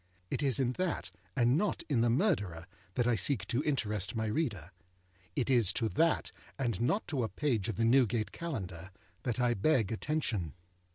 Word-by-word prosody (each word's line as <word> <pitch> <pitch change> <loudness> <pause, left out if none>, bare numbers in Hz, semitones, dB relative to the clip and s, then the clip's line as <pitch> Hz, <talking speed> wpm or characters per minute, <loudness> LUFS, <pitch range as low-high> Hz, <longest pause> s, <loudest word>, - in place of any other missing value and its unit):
It - - -1
is 140 -2 +2
in 125 -2 +2
that, 185 -2 -1 0.2
and 120 -1 +4
not 210 -1 -1
in 135 -7 +2
the 120 - +3
Murderer, 105 - +1 0.3
that 120 - +2
I 120 -1 +3
seek 110 -3 +1
to 125 +2 +1
interest 105 -8 -1
my 110 0 0
reader. 105 - -2 0.6
It 130 - 0
is 120 -8 +4
to 115 -2 +1
that, 165 +5 +1 0.3
and 120 -6 -1
not 195 - +1
to 140 -5 0
a 115 - -1
page 120 -9 0
of 110 - -2
the 115 - +1
Newgate 115 -3 +3
Calendar, 95 - -5 0.3
that 125 -1 -2
I 120 -1 +3
beg 115 -1 +2
attention. 110 - -2
120 Hz, 180 wpm, -32 LUFS, 105-140 Hz, 0.6 s, and